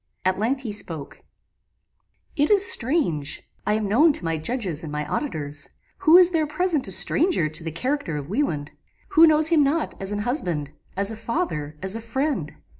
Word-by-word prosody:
At 185 0 +1
length 255 +5 0
he 235 -5 -5
spoke: 165 -8 -5 1.1
"It 295 -1 +2
is 400 -2 +5
strange; 230 - +1 0.2
I 210 - +2
am 215 -1 -1
known 290 +10 +4
to 180 - -1
my 165 0 0
judges 175 - -2
and 155 - -7
my 150 0 -3
auditors. 150 - -3 0.3
Who 345 -2 +7
is 365 -1 +7
there 320 -3 +1
present 310 - 0
a - - -3
stranger 195 - +3
to 155 +2 -2
the 165 - -3
character 250 - -2
of 140 -1 -6
Wieland? 165 - -2 0.4
who 330 -4 +7
knows 310 0 +4
him 320 -3 +4
not 300 +4 0
as 195 +1 -3
an 205 0 -2
husband 175 - -2 0.3
as 200 +2 +1
a - - -5
father 220 - -3
as 190 +2 0
a 225 - -5
friend? 230 - -2
220 Hz, 190 wpm, -23 LUFS, -, 1.1 s, Who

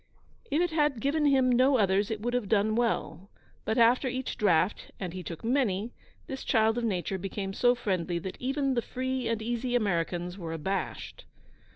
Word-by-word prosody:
If 300 - +1
it 350 - -1
had 295 -5 +1
given 295 +4 +1
him 265 -2 +4
no 260 +2 +4
others 200 0 +2
it 220 -2 -3
would 240 +2 -2
have 245 -6 -1
done 215 0 +2
well; 205 -6 -1 0.4
but, 220 +3 0
after 240 +3 +4
each 255 +1 -3
draught, 185 -1 +1
and 180 -4 -4
he 185 - -5
took 165 -2 -8
many, 230 -3 0 0.3
this 265 0 -6
child 225 0 +2
of - - -4
nature 190 -3 -1
became 195 +1 -4
so 245 +4 +3
friendly 185 -7 -1
that 185 +2 -6
even 270 +1 0
the 240 - +1
free 260 0 -3
and 225 -1 -1
easy 240 +2 -1
Americans 180 -3 -1
were 165 -2 -5
abashed. 175 +5 -4
225 Hz, 185 wpm, -29 LUFS, 195-255 Hz, 0.4 s, him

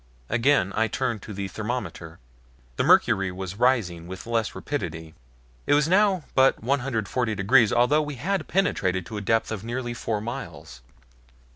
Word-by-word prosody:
Again 120 -4 +2
I 110 +1 +2
turned 115 -1 -2
to 105 - -9
the 100 -1 -4
thermometer. 105 -6 -5 0.6
The - - +1
mercury 95 -1 +4
was 95 +1 -6
rising 105 -10 +1
with 95 0 -8
less 115 -2 -1
rapidity. 80 - -5 0.5
It - - +4
was 150 0 +3
now 190 -1 +3
but 130 -4 +3
140 120 -3 -1
degrees, 110 +3 +4
although 125 +6 +3
we 145 -1 -5
had 190 +10 -2
penetrated 95 - 0
to 110 - -7
a - - -3
depth 115 +3 +1
of 110 -3 -4
nearly 120 +1 -4
four 115 -2 -2
miles. 85 - -7
115 Hz, 155 wpm, -25 LUFS, 95-130 Hz, 0.6 s, mercury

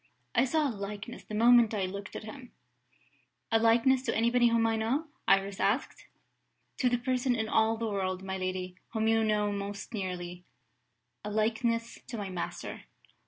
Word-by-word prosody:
I 245 +1 +4
saw 305 +3 +1
a 255 - -2
likeness, 205 +3 -6
the 215 - -7
moment 235 0 +6
I 195 -2 0
looked 200 +1 -7
at - - -5
him." 250 +3 -10 1.0
"A 225 - +4
likeness 235 +3 +4
to - - +1
anybody 235 +2 +4
whom 230 -1 +3
I 225 0 +2
know?" 235 +8 0 0.2
Iris 195 0 +3
asked. 215 +7 -1 0.7
"To 250 - +2
the 245 - +2
person 250 0 0
in 220 -1 -1
all 220 +1 +2
the 230 - -2
world, 190 -3 -2
my 190 0 -3
lady, 185 0 -3 0.2
whom 220 -1 +1
you 225 0 +3
know 210 -1 +1
most 200 +2 -5
nearly 180 -3 -4 0.8
a 210 - -4
likeness 230 +2 0
to 235 - -5
my 200 -2 -4
master." 180 - -5
220 Hz, 170 wpm, -30 LUFS, 200-235 Hz, 1.0 s, moment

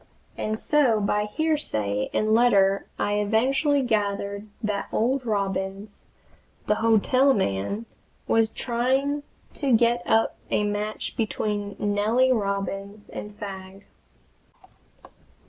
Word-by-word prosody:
And 215 0 -2
so 260 -5 +3
by 210 +1 0
hearsay 210 - -1
and 215 0 +1
letter 200 -4 +4
I 205 0 0
eventually 265 +7 +2
gathered 200 -2 -1 0.2
that 210 -2 -2
old 255 +3 0
Robins, 195 0 -3 0.6
the - - +3
hotel 255 +5 +4
man, 190 - -1 0.4
was 225 -1 +3
trying 265 +5 0 0.3
to 280 -3 -1
get 240 +1 +2
up 225 0 +2
a - - +1
match 210 +1 -3
between 210 -2 -2
Nellie 215 +5 +2
Robins 200 -1 -2
and 210 0 -8
Fagg. 195 -1 -8
210 Hz, 105 wpm, -25 LUFS, 200-240 Hz, 0.6 s, letter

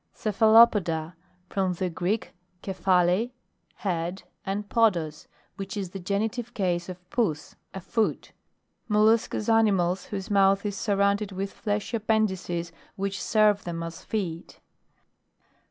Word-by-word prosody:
CEPHALOPODA. 210 -7 +4 0.4
From 190 -2 0
the 185 +1 -2
Greek 180 +5 -2 0.3
ke 195 - -3
phale, 185 +4 +2 0.5
head, 175 -1 -3 0.2
and 200 +2 -3
podos, 170 -11 +1 0.3
which 195 +1 -5
is 190 -3 -4
the 195 - -6
genitive 220 +6 -2
case 175 -3 -1
of 180 0 -9
pons, 170 -11 -1 0.2
a - - -3
foot. 220 +4 -1 0.6
Mol 210 -1 +3
luscous 220 -1 +2
animals 195 -5 +2
whose 200 -1 -6
mouth 195 0 +4
i: 205 - 0
surrounded 200 0 +1
with 195 +1 -4
fleshy 210 +2 -2
appendices 190 -6 -1 0.2
which 195 0 -3
serve 210 -2 +3
them 170 -1 -4
as 165 0 -7
feet. 180 -6 -4
195 Hz, 125 wpm, -26 LUFS, 180-215 Hz, 0.6 s, CEPHALOPODA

